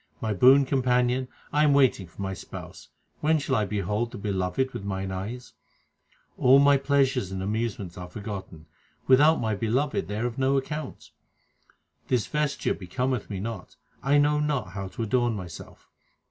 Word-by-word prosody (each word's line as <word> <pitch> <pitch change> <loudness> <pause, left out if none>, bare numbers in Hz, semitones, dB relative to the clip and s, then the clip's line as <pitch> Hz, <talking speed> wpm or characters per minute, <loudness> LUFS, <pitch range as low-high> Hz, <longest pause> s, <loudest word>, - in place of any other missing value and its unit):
My 110 -1 -1
boon 130 +7 +6
companion, 125 -1 +1 0.3
I 150 +1 +4
am 150 -2 +4
waiting 130 -9 +3
for 85 +4 -8
my 95 0 -3
Spouse; 85 - -10 0.3
when 155 +1 +3
shall 140 -3 -1
I 105 - +1
behold 105 +3 -2
the - - -7
Beloved 100 +6 -1
with 120 -4 -6
mine 95 -1 -3
eyes? 105 +7 -6 0.9
All 130 +2 +7
my 140 0 +6
pleasures 135 -7 +1
and 95 0 -4
amusements 105 -4 -3
are 90 0 -7
forgotten; 95 -6 -7 0.4
without 145 +5 +5
my 110 -2 -1
Beloved 115 - -1
they 105 +2 -4
are 115 - -1
of 120 +2 -3
no 135 +1 +2
account. 150 +3 -5 1.0
This 120 -6 +1
vesture 150 +3 -1
becometh 125 +6 -3
me 100 -3 -4
not; 105 -2 -6 0.3
I 140 +2 +3
know 150 +1 +3
not 150 -9 -1
how 95 +1 -5
to 115 +5 -5
adorn 120 +1 +1
myself. 90 -5 -9
120 Hz, 165 wpm, -26 LUFS, 100-135 Hz, 1.0 s, All